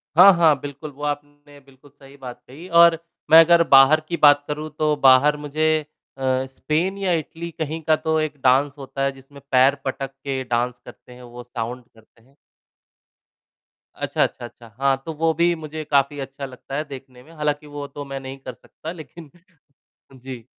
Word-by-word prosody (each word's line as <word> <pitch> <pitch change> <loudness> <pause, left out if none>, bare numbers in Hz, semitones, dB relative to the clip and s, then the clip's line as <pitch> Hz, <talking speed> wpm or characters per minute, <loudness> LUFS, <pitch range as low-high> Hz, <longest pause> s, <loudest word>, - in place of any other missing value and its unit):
हाँ, 185 +4 +9
हाँ। 165 -3 +4
बिल्कुल, 145 +2 -8
वो 145 +1 -12
आपने 145 0 -7
बिल्कुल 135 +1 -22
सही 135 0 -17
बात 125 -2 -10
कही 155 +8 -12
और 170 -1 +6 0.3
मैं 160 - +10
अगर 170 0 +5
बाहर 135 +3 +6
की 170 0 -3
बात 145 -1 +5
करूँ 150 +1 -5
तो 150 -1 +2
बाहर 140 +2 +5
मुझे 150 +2 -2 0.5
अ, 130 0 0
स्पेन 165 +8 -2
या 195 -2 -1
इटली 165 +1 -4
कहीं 160 +1 -3
का 155 - +5
तो 160 0 -1
एक 155 -1 -3
डाँस 135 +2 +3
होता 135 0 -7
है 140 - +1
जिसमें 135 +1 -16
पैर 130 +2 +4
पटक 135 0 -4
के 135 -1 -5
डाँस 120 0 -2
करते - - -15
हैं, 125 - -14
वो 120 0 -11
साउंड 120 0 -6
करते 110 +1 -24
हैं। 135 +3 -28 1.6
अच्छा, - - -1
अच्छा, 120 - -4
अच्छा। 120 0 -14
हाँ, 135 -1 +1
तो 160 - -5
वो 160 +1 0
भी 170 +2 +2
मुझे 155 -1 -7
काफ़ी 140 0 +2
अच्छा 135 +1 -7
लगता 130 +1 -9
है 150 - -1
देखने 130 -2 -12
में, 160 - -18
हालाँकि 150 -1 -3
वो 145 -1 -7
तो 145 +1 -9
मैं 135 0 -6
नहीं 135 0 -8
कर 130 -1 -8
सकता 155 +7 -10
लेकिन 160 -2 -12 0.8
जी। 130 -3 -10
145 Hz, 185 wpm, -22 LUFS, 130-155 Hz, 1.6 s, मैं